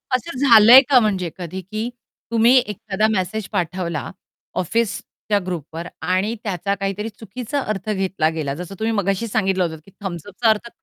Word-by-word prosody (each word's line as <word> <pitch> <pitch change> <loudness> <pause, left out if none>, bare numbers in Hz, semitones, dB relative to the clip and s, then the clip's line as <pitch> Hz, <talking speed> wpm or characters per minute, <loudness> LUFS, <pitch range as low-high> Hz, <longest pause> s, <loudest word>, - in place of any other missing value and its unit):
असं 275 +3 -4
झालंय 240 -1 +9
का 265 -3 +7
म्हणजे 195 -6 0
कधी 180 +1 -6
की 215 +5 -4 0.4
तुम्ही 230 +3 +5
एखादा 210 -2 -1
मेसेज 190 +1 -2
पाठवला 175 -4 -2 0.5
ऑफिसच्या 210 +1 -1
ग्रुपवर 170 -1 -5
आणि 185 +7 0
त्याचा 200 -1 -1
काहीतरी 195 +2 -3
चुकीचा 225 +5 -5
अर्थ 215 -4 -4
घेतला 190 -6 0
गेला, 155 -4 -3
जसं 180 +5 -7
तुम्ही 225 +1 0
मगाशी 200 +1 0
सांगितलं 195 -3 +1
होतं 160 -2 -3
की 195 - -17
थंब्स 175 -5 -5
अपचा 220 +3 +1
अर्थ 220 +2 +1
200 Hz, 155 wpm, -21 LUFS, 180-220 Hz, 0.5 s, झालंय